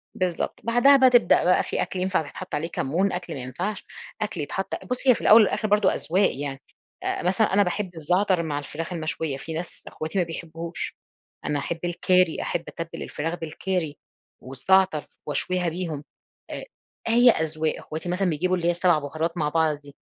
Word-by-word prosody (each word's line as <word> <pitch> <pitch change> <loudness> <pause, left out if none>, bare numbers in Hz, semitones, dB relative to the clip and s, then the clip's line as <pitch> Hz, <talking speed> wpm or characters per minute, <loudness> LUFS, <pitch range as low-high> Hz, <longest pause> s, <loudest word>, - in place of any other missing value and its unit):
بالضبط، 180 -2 -2
بعدها 245 +5 +6
بقى 260 -1 +6
تبدأ 245 -7 +5
بقى 180 - +4
في - - -2
أكْل 185 - -3
ينفع 185 +1 +1
يتحط - - -6
عليه 155 +3 -2
كمون، 170 +6 0
أكْل 180 -2 -4
ما 135 - -5
ينفعش، 175 - -4 0.4
أكْل 205 -6 -2
يتحط 190 +7 -4
بُصّ، 250 +2 -3
هي 250 - +7
في - - -7
الأول 220 +2 +8
والآخر 215 +1 +1
برضو 210 -2 +4
أذواق 190 +5 +1
يعني، 140 -2 -4 0.4
آآ - - -2
مثلًا 190 +3 +2
أنا 205 - +5
باحب 180 -1 -3
الزعتر 180 +3 +1
مع 145 -3 -2
الفراخ 165 +4 -6
المشوية، 155 -3 -2
في 160 +3 -7
ناس 165 +2 -6
أخواتي 160 +5 -5
ما 180 - +4
بيحبوهوش، 165 0 -6 0.5
أنا 145 -1 0
أحب 165 +4 -4
الكاري، 180 0 +2
أحب 170 - -2
أتبل 165 0 -6
الفراخ 165 +4 -4
بالكاري 165 -1 -3 0.4
والزعتر 160 +5 +2 0.2
وأشويها 180 +4 0
بيهم، 165 -4 -4 0.5
آآ، - - -6 0.4
هي 240 +2 +6
أذواق، 160 -2 -1
أخواتي 160 +3 -6
مثلًا 180 +1 +1
بيجيبوا 180 +4 +1
اللي 170 -2 -1
هي - - +5
السبع 175 -2 +3
بهارات 160 +4 -3
مع 150 -2 +1
بعض 160 -1 +1
دي، 145 -1 -15
170 Hz, 180 wpm, -25 LUFS, 155-190 Hz, 0.5 s, الأول